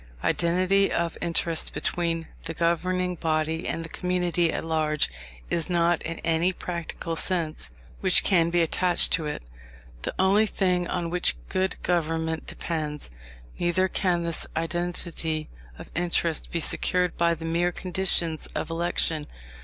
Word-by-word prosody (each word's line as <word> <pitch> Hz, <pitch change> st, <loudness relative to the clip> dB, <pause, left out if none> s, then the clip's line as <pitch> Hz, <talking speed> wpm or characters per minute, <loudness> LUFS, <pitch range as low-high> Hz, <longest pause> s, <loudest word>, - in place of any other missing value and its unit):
Identity 185 Hz, +3 st, +2 dB
of 170 Hz, -1 st, -1 dB
interest 165 Hz, -1 st, -1 dB
between 165 Hz, -2 st, -1 dB, 0.2 s
the 165 Hz, 0 st, -5 dB
governing 180 Hz, +2 st, 0 dB
body 160 Hz, 0 st, -1 dB
and 165 Hz, -, -2 dB
the -, -, -9 dB
community 180 Hz, -2 st, 0 dB
at -, -, -3 dB
large 155 Hz, -, 0 dB, 0.4 s
is 165 Hz, 0 st, 0 dB
not, 170 Hz, -1 st, +2 dB
in 165 Hz, 0 st, -4 dB
any 165 Hz, +2 st, +2 dB
practical 170 Hz, -1 st, -4 dB
sense 165 Hz, -, -2 dB, 0.3 s
which -, -, +5 dB
can 170 Hz, -4 st, +3 dB
be 175 Hz, 0 st, +3 dB
attached 175 Hz, +2 st, +4 dB
to 160 Hz, -3 st, +2 dB
it, 150 Hz, -, -4 dB, 0.6 s
the -, -, -4 dB
only 200 Hz, +3 st, +4 dB
thing 180 Hz, -3 st, 0 dB
on 175 Hz, -2 st, -2 dB
which 175 Hz, -, +2 dB
good 190 Hz, 0 st, 0 dB
government 160 Hz, -2 st, -1 dB
depends; 150 Hz, -, -4 dB, 0.5 s
neither 175 Hz, +2 st, +2 dB
can 180 Hz, -3 st, 0 dB
this 170 Hz, -1 st, -1 dB
identity 165 Hz, -1 st, -2 dB, 0.3 s
of -, -, -11 dB
interest 170 Hz, -2 st, 0 dB
be 170 Hz, -, -2 dB
secured 180 Hz, +2 st, +2 dB
by 170 Hz, 0 st, +2 dB
the 165 Hz, 0 st, -8 dB
mere 170 Hz, +2 st, +1 dB
conditions 175 Hz, -3 st, +3 dB
of -, -, -3 dB
election. 165 Hz, -2 st, +1 dB
170 Hz, 140 wpm, -26 LUFS, 165-180 Hz, 0.6 s, which